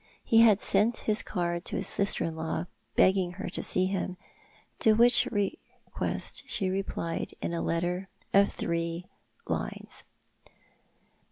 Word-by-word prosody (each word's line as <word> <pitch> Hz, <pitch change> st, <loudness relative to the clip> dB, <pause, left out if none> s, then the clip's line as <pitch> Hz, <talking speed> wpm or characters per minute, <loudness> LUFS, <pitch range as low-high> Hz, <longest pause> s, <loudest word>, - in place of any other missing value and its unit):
He 225 Hz, -1 st, +5 dB
sent 210 Hz, +3 st, +2 dB
his 215 Hz, 0 st, +3 dB
card 175 Hz, -3 st, -3 dB
to -, -, -4 dB
his -, -, -2 dB
sister 200 Hz, 0 st, 0 dB
in 165 Hz, -, -3 dB
law, 160 Hz, +1 st, -3 dB, 0.3 s
begging 185 Hz, -2 st, +3 dB
her -, -, -6 dB
to -, -, -3 dB
see 185 Hz, -, +4 dB
him, 185 Hz, -1 st, -3 dB, 0.6 s
to 220 Hz, -, +5 dB
which 240 Hz, +2 st, +6 dB
request 205 Hz, -3 st, -3 dB
she 190 Hz, -1 st, +1 dB
replied 185 Hz, -3 st, -3 dB
in -, -, -3 dB
a 170 Hz, -, -2 dB
letter 175 Hz, +3 st, -2 dB, 0.2 s
of 200 Hz, 0 st, +5 dB
three 170 Hz, +1 st, -3 dB, 0.4 s
lines. -, -, -4 dB
185 Hz, 135 wpm, -28 LUFS, 170-200 Hz, 0.6 s, which